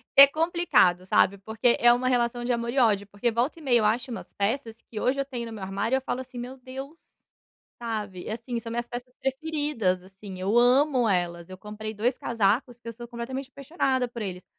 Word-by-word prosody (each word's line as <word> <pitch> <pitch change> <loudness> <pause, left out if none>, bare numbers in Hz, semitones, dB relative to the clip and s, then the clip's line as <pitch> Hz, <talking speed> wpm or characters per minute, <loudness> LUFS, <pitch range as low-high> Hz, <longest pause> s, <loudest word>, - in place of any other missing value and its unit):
é 275 0 +11
complicado 310 - +2
sabe? 195 +1 +3
Porque 220 +4 +1
é 240 - +7
uma 245 +1 +1
relação 240 -1 +1
de 250 - 0
amor 235 0 -2
e 275 - -5
ódio, 205 -4 +3
porque 205 +4 -1
volta 250 +8 -1
e - - -14
meia 245 -5 +3
eu 215 - +1
acho 240 +4 +1
umas 230 - -7
peças 225 +2 -2
que 215 - -8
hoje 270 +2 +1
eu 275 - 0
tenho 245 -4 -5
no 225 - -8
meu 210 -3 -7
armário, 200 +6 -1
eu 265 - 0
falo 260 0 -3
assim: 255 -1 -11
"Meu 250 +2 -6
Deus", 270 +5 -9 0.8
sabe? 210 -6 -4
Assim 235 +2 -4
são 230 0 -7
minhas 240 0 -2
peças 245 +1 -7
preferidas, 270 - -1
assim 190 0 -10
eu 205 +5 +2
amo 250 -1 +4
elas, 175 -1 -1
eu 185 - -9
comprei 215 +1 -7
2 235 +5 0
casacos 235 +2 0
que 230 - -14
eu 230 - -5
sou 240 +1 -9
completamente 260 +3 -5
apaixonada 270 -3 -1
por 235 -1 -8
eles. 185 -3 -5
235 Hz, 215 wpm, -26 LUFS, 210-260 Hz, 0.8 s, é